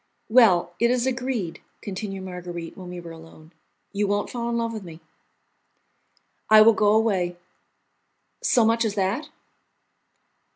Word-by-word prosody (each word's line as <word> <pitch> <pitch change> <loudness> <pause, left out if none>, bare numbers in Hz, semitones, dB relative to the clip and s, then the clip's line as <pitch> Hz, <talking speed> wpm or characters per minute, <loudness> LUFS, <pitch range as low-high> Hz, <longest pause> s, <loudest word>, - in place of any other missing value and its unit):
"Well, 200 -8 +4
it 235 - +3
is 250 0 +1
agreed," 250 -8 -3 0.2
continued 195 -1 -6
Marguerite, 175 -2 -7
when 185 -2 -10
we 180 0 -7
were 170 -1 -10
alone, 165 0 -15 0.4
"you 205 0 0
won't 205 0 -1
fall 235 -1 -3
in 235 - -1
love 230 0 -2
with 220 - -6
me?" 165 -3 -11 1.5
"I 215 0 +8
will 225 +1 +6
go 210 -1 +3
away." 190 -6 +1 1.0
"So 235 -3 +3
much 230 +1 +2
as 215 -3 -2
that?" 210 +10 -1
205 Hz, 140 wpm, -24 LUFS, 180-230 Hz, 1.5 s, I